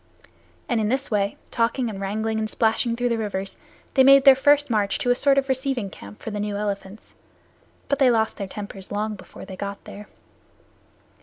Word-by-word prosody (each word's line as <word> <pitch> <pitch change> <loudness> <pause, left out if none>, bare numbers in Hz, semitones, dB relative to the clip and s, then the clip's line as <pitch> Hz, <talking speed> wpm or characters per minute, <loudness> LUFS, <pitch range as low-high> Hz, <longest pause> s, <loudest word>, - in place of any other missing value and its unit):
And 235 -3 +1
in 210 - 0
this 265 +1 -1
way, 200 -1 0
talking 235 +2 0
and 200 -3 -6
wrangling 220 +3 -2
and 215 0 -2
splashing 230 +1 +1
through 245 +1 0
the 230 -1 0
rivers, 195 -3 -4 0.4
they 265 - +5
made 275 +1 +7
their 270 -1 +9
first 290 +2 +3
march 210 -4 0
to 245 - 0
a - - +4
sort 275 +2 +3
of 275 0 +2
receiving 260 -6 -1
camp 100 +1 -12
for 225 - -5
the 205 - -4
new 205 0 -2
elephants. 205 0 -5 0.7
But 280 - 0
they 265 -2 +5
lost 220 -2 +1
their 200 - -4
tempers 200 -1 -8
long 210 +1 -2
before 190 - -11
they 190 - -9
got 200 +1 -6
there. 205 +1 -10
220 Hz, 200 wpm, -23 LUFS, 205-255 Hz, 0.7 s, their